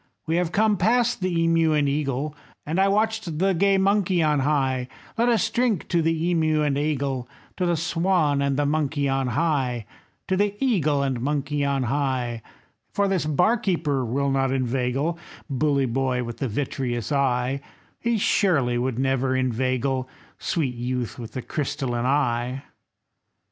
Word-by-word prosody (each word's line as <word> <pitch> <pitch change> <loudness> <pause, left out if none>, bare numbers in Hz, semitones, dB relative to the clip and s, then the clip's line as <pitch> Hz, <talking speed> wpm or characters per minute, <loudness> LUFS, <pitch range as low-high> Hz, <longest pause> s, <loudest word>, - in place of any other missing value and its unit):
We 165 +1 0
have 175 -2 0
come 210 +1 +2
past 235 +4 +2
the 170 -3 +1
emeu 165 -1 +3
and 145 -1 +2
eagle, 140 0 -1 0.3
And 160 +5 -1
watched 200 -3 +1
the 190 +3 +2
gay 195 +3 +3
monkey 190 -3 +2
on 150 -2 +2
high; 135 -3 0 0.3
Let 235 +2 +2
us 225 -1 +2
drink 235 -6 0
to 170 -2 +2
the 165 +2 +1
emeu 155 -2 +2
and 140 -2 +1
eagle, 140 -3 -1 0.3
To 180 - 0
the 170 -1 +1
swan 165 -3 +1
and 140 -1 0
the 145 - +1
monkey 145 -1 0
on 135 -1 0
high, 125 -4 0 0.4
To 190 - +1
the 205 +1 +1
eagle 155 - +2
and 130 -3 -1
monkey 145 +1 -1
on 140 -1 0
high; 125 -3 -1 0.5
For 200 0 +1
this 185 -5 0
bar 180 - +3
keeper 160 - 0
will 135 +4 0
not 135 -1 +1
inveigle, 135 +5 -1 0.3
Bully 140 0 +2
boy 130 0 0
with 120 0 -7
the 135 - -1
vitreous 120 -1 -3
eye, 135 -1 +1 0.4
He 235 -1 0
surely 140 - +2
would 125 -1 -1
never 135 0 +1
inveigle, 130 +1 0 0.3
Sweet 145 -8 -1
youth 125 0 -3
with 115 -2 -8
the 130 - -4
crystalline 135 -5 -2
eye." 130 -1 0
145 Hz, 160 wpm, -24 LUFS, 130-170 Hz, 0.5 s, emeu